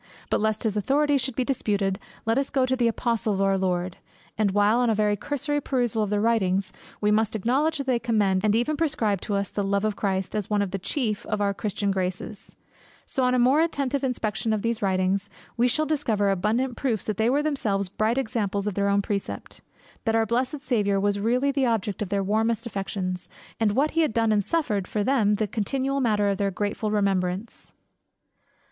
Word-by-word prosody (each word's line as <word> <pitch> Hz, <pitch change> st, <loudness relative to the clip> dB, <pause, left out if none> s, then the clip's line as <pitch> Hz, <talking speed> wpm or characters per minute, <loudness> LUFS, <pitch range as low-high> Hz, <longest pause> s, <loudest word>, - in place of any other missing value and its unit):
But -, -, +2 dB
lest 220 Hz, 0 st, 0 dB
his 215 Hz, -3 st, 0 dB
authorities 280 Hz, +6 st, +2 dB
should 255 Hz, 0 st, -3 dB
be 255 Hz, -, 0 dB
disputed, 205 Hz, -7 st, 0 dB, 0.3 s
let 225 Hz, +3 st, +2 dB
us 275 Hz, -, -1 dB
go 265 Hz, -2 st, +2 dB
to 260 Hz, 0 st, +1 dB
the 245 Hz, -2 st, +2 dB
Apostles 230 Hz, -2 st, 0 dB
of 195 Hz, -, -1 dB
our 195 Hz, 0 st, +3 dB
Lord; 180 Hz, -1 st, -1 dB, 0.4 s
and 210 Hz, -2 st, +2 dB
while, 205 Hz, +4 st, +3 dB
on 245 Hz, -1 st, +2 dB
a 220 Hz, -, +2 dB
very 210 Hz, 0 st, +2 dB
cursory 290 Hz, +6 st, -2 dB
perusal 240 Hz, -5 st, 0 dB
of 210 Hz, -, 0 dB
their 210 Hz, 0 st, +1 dB
writings, 195 Hz, -4 st, +1 dB, 0.3 s
we 210 Hz, 0 st, +2 dB
must 220 Hz, 0 st, +2 dB
acknowledge 270 Hz, +10 st, +1 dB
that 275 Hz, -, -3 dB
they 255 Hz, -3 st, +1 dB
commend 205 Hz, -5 st, +1 dB
and 215 Hz, 0 st, +3 dB
even 245 Hz, +7 st, +1 dB
prescribe 225 Hz, -, 0 dB
to 205 Hz, -, -2 dB
us 200 Hz, -1 st, -1 dB
the 205 Hz, -, -1 dB
love 200 Hz, +1 st, 0 dB
of 215 Hz, -1 st, 0 dB
Christ, 190 Hz, -1 st, -2 dB
as 210 Hz, -3 st, -2 dB
one 205 Hz, -1 st, +2 dB
of 195 Hz, -, -4 dB
the 195 Hz, -, -3 dB
chief 215 Hz, -, -2 dB
of 215 Hz, -, -1 dB
the 200 Hz, -1 st, +1 dB
Christian 200 Hz, 0 st, -2 dB
graces; 190 Hz, +2 st, -4 dB, 0.5 s
so 265 Hz, -, -1 dB
on 250 Hz, 0 st, +3 dB
a -, -, +3 dB
more 260 Hz, +5 st, +4 dB
attentive 280 Hz, -4 st, 0 dB
inspection 225 Hz, -3 st, -1 dB
of 210 Hz, -, -2 dB
those 230 Hz, 0 st, -1 dB
writings, 190 Hz, +1 st, 0 dB, 0.3 s
we 245 Hz, +1 st, +3 dB
shall 305 Hz, +5 st, +1 dB
discover 225 Hz, -10 st, +1 dB
abundant 225 Hz, +7 st, 0 dB
proofs 230 Hz, -7 st, -1 dB
that 210 Hz, -3 st, -2 dB
they 220 Hz, +1 st, +2 dB
were 285 Hz, +3 st, +2 dB
themselves 210 Hz, -10 st, 0 dB
bright 215 Hz, +5 st, 0 dB
examples 210 Hz, -6 st, -1 dB
of 210 Hz, -, -1 dB
their 200 Hz, +1 st, +1 dB
own 200 Hz, 0 st, +2 dB
precept; 200 Hz, -1 st, -4 dB, 0.4 s
that 225 Hz, -1 st, +2 dB
our 225 Hz, 0 st, +3 dB
blessed 255 Hz, +6 st, -1 dB
Saviour 205 Hz, -8 st, +1 dB
was 205 Hz, 0 st, +1 dB
really 250 Hz, +6 st, +2 dB
the 270 Hz, -2 st, +1 dB
object 215 Hz, -4 st, -1 dB
of 205 Hz, -, -2 dB
their 200 Hz, 0 st, 0 dB
warmest 225 Hz, +3 st, 0 dB
affection, 195 Hz, -4 st, -3 dB, 0.4 s
and 215 Hz, -2 st, +2 dB
what 285 Hz, +6 st, +2 dB
he 330 Hz, -, +2 dB
had 310 Hz, -8 st, +1 dB
done 225 Hz, -1 st, +2 dB
and 205 Hz, -1 st, +2 dB
suffered 210 Hz, -, -1 dB
for 210 Hz, -, -1 dB
them 220 Hz, -4 st, +3 dB
the 215 Hz, +1 st, 0 dB
continual 265 Hz, +7 st, -1 dB
matter 210 Hz, -4 st, +2 dB
of 195 Hz, -, -1 dB
their 200 Hz, -1 st, +1 dB
grateful 205 Hz, +3 st, -2 dB
remembrance. 195 Hz, 0 st, -1 dB
215 Hz, 215 wpm, -25 LUFS, 200-250 Hz, 0.5 s, more